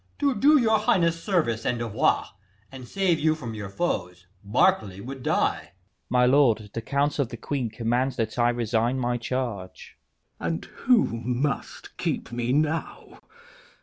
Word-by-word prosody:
To 280 -2 +2
do 290 +7 +5
your 220 -3 +3
highness 170 -5 +1
service 155 - 0
and 125 - 0
devoir, 115 -3 0 0.4
And 130 -2 -10
save 185 -2 +1
you 155 0 +2
from 125 -7 -7
your 105 -3 -6
foes, 90 - -3 0.2
Berkeley 105 - +2
would 130 +5 -7
die. - - +1 0.2
Leices. 95 +3 -43
My 125 0 +4
lord, 120 -6 +3
the 115 - -3
council 140 +5 0
of 130 - -2
the 120 - -7
queen 125 0 -3
command 120 +4 0
That 115 -1 -3
I 120 0 +4
resign 120 +1 0
my 120 -1 0
charge. 115 -6 -5 0.4
K. - - -6
Edw. 85 - 0
And 80 - -7
who 245 -2 +2 0.2
must 125 +4 -3
keep - - -3
me 120 0 -2
now? 155 +3 -2
125 Hz, 165 wpm, -25 LUFS, 115-155 Hz, 0.4 s, do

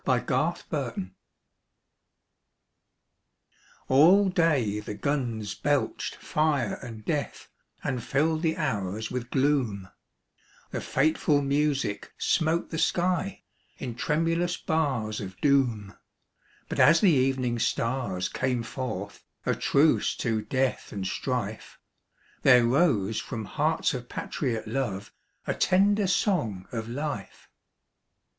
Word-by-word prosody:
89 - - +4
IN - - -1
THE - - +1
TRENCHES. 95 0 -5 2.8
ALL 180 +9 +6
day 150 - +2
the 105 0 -6
guns 115 -5 -2
belched - - -1
fire 150 -8 0
and 115 -4 -9
death 150 -3 -3 0.3
And 125 -3 -2
filled 155 +3 +1
the 160 0 0
hours 105 - -2
with 125 -1 -4
gloom; 130 -9 0 0.8
The - - -3
fateful 145 0 +2
music 140 -7 0
smote 165 +1 +1
the 160 - -2
sky 180 +3 0 0.3
In 125 -3 -5
tremulous 165 +7 0
bars 130 -10 -1
of 95 -1 -8
doom; 120 -9 +1 0.7
But - - -4
as 165 - +7
the 200 -4 +6
evening 130 -4 +1
stars 115 -7 -1
came 125 -2 -1
forth 110 -5 -5 0.2
A - - +2
truce 150 +3 +2
to 115 -3 -1
death 130 +4 -1
and 100 -2 -4
strife, 110 +1 -3 0.6
There 125 -3 +6
rose 115 - +2
from 115 -2 -5
hearts 155 +7 0
of 125 -2 -6
patriot 115 -6 -3
love 110 -5 -3 0.3
A - - 0
tender 200 +2 +3
song 115 - 0
of 115 -1 -4
life. 130 -5 -5
130 Hz, 115 wpm, -27 LUFS, 110-155 Hz, 2.8 s, as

